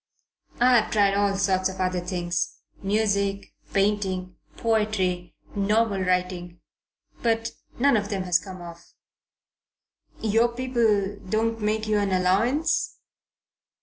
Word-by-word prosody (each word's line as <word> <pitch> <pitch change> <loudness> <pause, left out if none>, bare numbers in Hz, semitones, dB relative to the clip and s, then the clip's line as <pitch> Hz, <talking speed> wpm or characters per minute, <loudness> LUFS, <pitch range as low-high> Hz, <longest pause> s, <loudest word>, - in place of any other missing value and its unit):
"I've 245 -2 +4
tried 205 -3 +3
all 200 0 +2
sorts 190 -1 +1
of 190 0 -8
other 185 -1 0
things 175 -2 -2 0.3
music, 200 -1 0 0.2
painting, 195 -3 0 0.2
poetry, 210 -6 0 0.2
novel 205 0 +1
writing 180 -1 -1 0.6
but 225 -1 0 0.3
none 275 +1 +4
of 205 -1 0
them 195 -3 -2
has 180 -2 +3
come 185 -2 -9
off." 170 0 -12 1.2
"Your 225 +2 +3
people 225 -6 +1
don't 225 +1 0
make 215 +1 0
you 210 -1 +2
an 200 -1 0
allowance?" 210 - +1
200 Hz, 115 wpm, -25 LUFS, 185-220 Hz, 1.2 s, I've